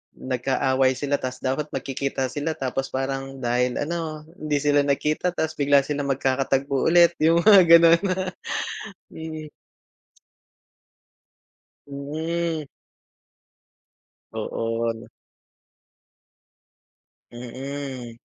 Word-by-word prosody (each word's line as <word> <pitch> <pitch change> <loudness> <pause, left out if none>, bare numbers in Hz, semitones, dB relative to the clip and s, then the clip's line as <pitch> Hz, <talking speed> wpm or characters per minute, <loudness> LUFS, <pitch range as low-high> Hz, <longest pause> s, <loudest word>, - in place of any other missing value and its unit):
nag-aaway 130 +1 +1
sila. 145 +1 -1
Tas, 130 0 -5
dapat 135 +3 -1
magkikita 135 -1 -2
sila 150 +3 -2
tapos 135 -2 -3
parang, 135 0 -3
dahil 125 +1 +1
ano 155 -1 -4 0.2
hindi 150 -1 -1
sila 145 0 +3
nagkita 150 +5 0
tapos 160 -1 -2
bigla 140 0 +5
silang 145 0 -3
magkakatagpo 135 +1 0
ulit, 170 0 +6
yung 165 +1 +5
mga 205 -3 +9
ganun. 170 0 +7 1.1
Mm. 155 -1 -7 2.4
Mhm. 160 +3 -3 1.7
Oo, 115 0 -2
ano. 115 +1 -6 2.2
Mm. 125 0 -7
140 Hz, 85 wpm, -24 LUFS, 130-155 Hz, 2.4 s, mga